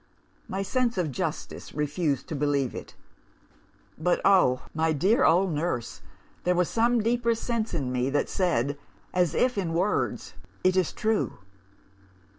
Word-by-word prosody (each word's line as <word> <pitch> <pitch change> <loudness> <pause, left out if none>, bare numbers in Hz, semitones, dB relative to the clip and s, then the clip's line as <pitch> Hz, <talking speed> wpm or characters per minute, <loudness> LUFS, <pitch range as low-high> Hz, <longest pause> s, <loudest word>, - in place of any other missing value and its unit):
My 195 +1 -2
sense 245 +3 0
of 170 -5 0
justice 125 - -5
refused 150 -1 -1
to 155 - -3
believe 140 -3 0
it. - - -9 1.0
But, 175 +2 +2
oh, 180 -11 +4
my 160 0 +1
dear 200 - +3
old 185 +2 +4
nurse, 150 -6 -3 0.4
there 180 0 +2
was 180 -1 +1
some 235 0 +2
deeper 235 0 +1
sense 230 -2 -2
in 135 -6 -2
me 125 +1 0
that 145 +1 0
said, 145 -6 0 0.3
as 175 -3 +1
if 250 -4 +2
in 170 -4 -2
words, 185 +5 -1 0.3
It 185 0 +3
is 185 -3 +2
true! 220 - -1
180 Hz, 145 wpm, -27 LUFS, 145-210 Hz, 1.0 s, oh